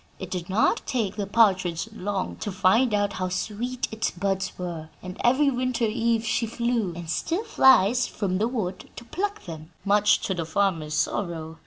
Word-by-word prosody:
It 185 -1 -8
did 180 -1 -4
not 200 +4 +2
take 225 -8 -1
the 205 -2 -3
partridge 190 -5 +2
long 200 -2 -3
to 205 - -4
find 205 +7 +3
out 205 -1 +1
how 185 0 -2
sweet 225 +7 -3
its 220 0 -1
buds 190 +1 -2
were, 170 -3 -5
and 185 0 -7
every 275 +4 +4
winter 250 -2 0
eve 230 0 0
she 230 +1 0
flew, 235 -3 -1
and 170 -1 -7
still 335 - -1
flies, 250 - +4
from 190 -3 -2
the 220 - +2
wood 215 -7 -4
to 235 - -10
pluck 405 - -3
them, 160 -3 -8 0.2
much 205 +1 +4
to 190 - -1
the 170 -2 -2
farmer's 165 -3 0
sorrow. 165 -4 -2
205 Hz, 180 wpm, -25 LUFS, 185-235 Hz, 0.2 s, every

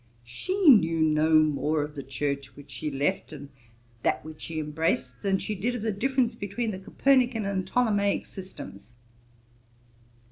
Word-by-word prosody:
She 370 - -2
knew 165 - +6
no 155 0 +3
more 150 0 +2
of 150 0 -7
the 145 - -6
Church 140 +1 -4
which 145 -1 -13
she 130 +5 -4
left, 145 +8 -1
and 145 -2 -9 0.5
that - - 0
which 155 -1 -10
she 160 -1 -4
embraced, 150 -5 -1
than 195 -1 +1
she 215 - -4
did 225 +5 -2
of 230 - -4
the 220 - 0
difference 245 +2 0
between 220 +2 -3
the 190 - -6
Copernican 245 +1 +2
and 190 -2 -2
Ptolemaick 205 -3 +1
systems.' 180 - -10
165 Hz, 155 wpm, -27 LUFS, 145-215 Hz, 0.5 s, knew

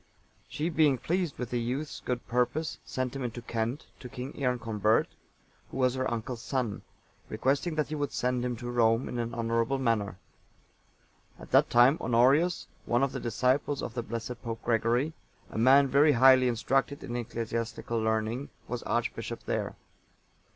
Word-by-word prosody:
She, 155 +3 -2
being 150 -4 +4
pleased 175 +3 -1
with 125 -2 -5
the 120 -1 0
youth's 135 +6 -3
good 125 -1 -3
purpose, 125 +6 0
sent 130 0 -3
him 135 - -3
into 120 0 -5
Kent, 115 +4 -3
to 125 - -9
King 125 +3 -6
Earconbert,(894) 115 -5 +1 0.6
who - - -7
was 130 -1 +3
her 130 0 -1
uncle's 120 +1 -4
son, 125 -6 -2 0.5
requesting 145 +5 0
that 150 -1 0
he - - -4
would 145 -2 -2
send 125 0 -1
him 125 -1 -1
to 120 +1 -6
Rome 115 0 +3
in 120 - -4
an 115 0 -3
honourable 115 +3 0
manner. 115 -7 0 1.2
At - - -13
that - - +5
time, 125 +5 +5
Honorius,(895) 135 +9 +2
one 120 +3 +2
of 135 - +1
the 135 - -4
disciples 130 +5 0
of - - -4
the 120 - -2
blessed 115 +1 -5
Pope 115 -1 -5
Gregory, 120 +6 +1 0.4
a - - -3
man 135 +4 +6
very 145 +3 +5
highly 130 0 +6
instructed 135 +4 0
in 120 - -5
ecclesiastical 115 0 -3
learning, 110 +4 -1 0.2
was - - -4
archbishop - - -3
there. - - -2
125 Hz, 165 wpm, -29 LUFS, 115-135 Hz, 1.2 s, man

